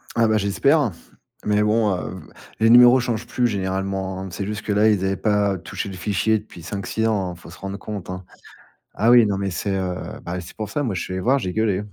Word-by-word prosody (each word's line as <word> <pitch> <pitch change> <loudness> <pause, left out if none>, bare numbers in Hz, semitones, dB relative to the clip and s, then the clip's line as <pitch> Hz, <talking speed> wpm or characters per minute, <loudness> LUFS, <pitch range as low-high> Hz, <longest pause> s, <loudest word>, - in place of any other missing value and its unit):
Ah 115 -1 +3
bah 110 - +3
j'espère, 125 +6 +2 0.6
mais 105 0 +3
bon, 105 0 +2
heu, 90 +1 -6
v 75 - -16 0.3
les 115 - +5
numéros 125 +2 +8
changent 120 -3 -2
plus 125 - 0
généralement, 95 -2 -2
hein. 95 - -6
C'est 90 +3 -4
juste 105 +2 -4
que - - -6
là, 105 +2 +4
ils 100 -3 +1
avaient 95 0 0
pas 105 -2 +1
touché 90 +3 -6
le 95 - -7
fichier 105 +4 +1
depuis 105 -5 -13
5-6 100 +5 -2
ans, 95 -5 0
faut 85 - -14
se 85 - -12
rendre 100 0 -6
compte, 105 -4 -7
hein. 90 0 -5 0.7
Ah 110 +3 +2
oui, 120 -1 +7
non, 100 -2 0
mais 100 -1 -2
c'est, 100 +3 -2
heu, 95 -2 -1 0.3
bah, 90 +1 -4
c'est 85 - -11
pour 110 -1 -4
ça 145 - -2
moi, 115 -8 -2
je 90 - -2
suis - - -5
allé 95 - -2
voir, 135 +7 +3
j'ai 90 -7 -3
gueulé. 105 -3 0
100 Hz, 240 wpm, -22 LUFS, 95-110 Hz, 0.7 s, numéros